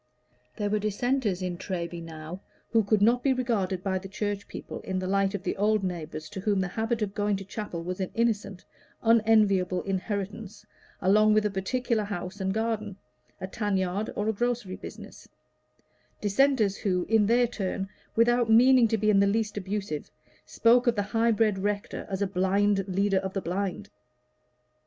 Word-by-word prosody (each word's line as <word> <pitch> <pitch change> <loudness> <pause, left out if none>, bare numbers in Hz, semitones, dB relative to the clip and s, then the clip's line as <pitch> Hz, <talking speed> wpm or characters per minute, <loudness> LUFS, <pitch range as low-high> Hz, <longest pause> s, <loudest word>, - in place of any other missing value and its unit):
There 205 -1 -2
were 215 - +2
Dissenters 215 -1 0
in 180 -1 -3
Treby 175 -3 -4
now 165 +2 -8 0.3
who 225 -2 +4
could 205 0 +2
not 240 +3 +4
be 270 +1 +3
regarded 205 -8 -1
by 190 -1 0
the 195 - -9
Church 205 +1 -3
people - - -7
in 190 - -3
the 185 - -2
light 195 +1 +1
of 195 - -6
old 210 0 +2
neighbors 160 -4 -4
to 205 - -7
whom 200 0 +1
the 190 - 0
habit 225 +3 -1
of 200 -1 -3
going 205 0 0
to 195 0 -6
chapel 195 -4 -5
was 180 +2 -4
an 190 - -2
innocent, 205 -5 -1 0.4
unenviable 215 -5 +3
inheritance 200 +2 -4 0.4
along 215 +3 +4
with 215 0 +3
a 210 - +1
particular 220 +3 -1
house 190 0 -5
and 190 0 0
garden, 215 -2 -2 0.4
a 185 - -4
tan 205 +1 -1
yard, 190 +3 -1
or 210 - -1
a 220 - +2
grocery 235 -3 -2
business - - -11 0.9
Dissenters 215 -1 +2
who, 180 -3 0
in 220 -2 +3
their 240 +2 +4
turn, 195 -4 -3 0.3
without 240 0 +3
meaning 245 +2 +6
to 225 - 0
be 215 0 +2
in 200 - +4
the 200 - +4
least 210 +1 0
abusive, 195 -5 -4 0.4
spoke 240 +2 +3
of 240 - +4
the 205 - 0
high 225 +3 +1
bred 215 -3 +2
rector 200 +1 -3
as 195 0 -1
a - - +2
blind 195 +2 +1
leader 195 +1 +1
of 190 0 -5
the 195 - -2
blind. 185 - -3
205 Hz, 180 wpm, -27 LUFS, 190-220 Hz, 0.9 s, meaning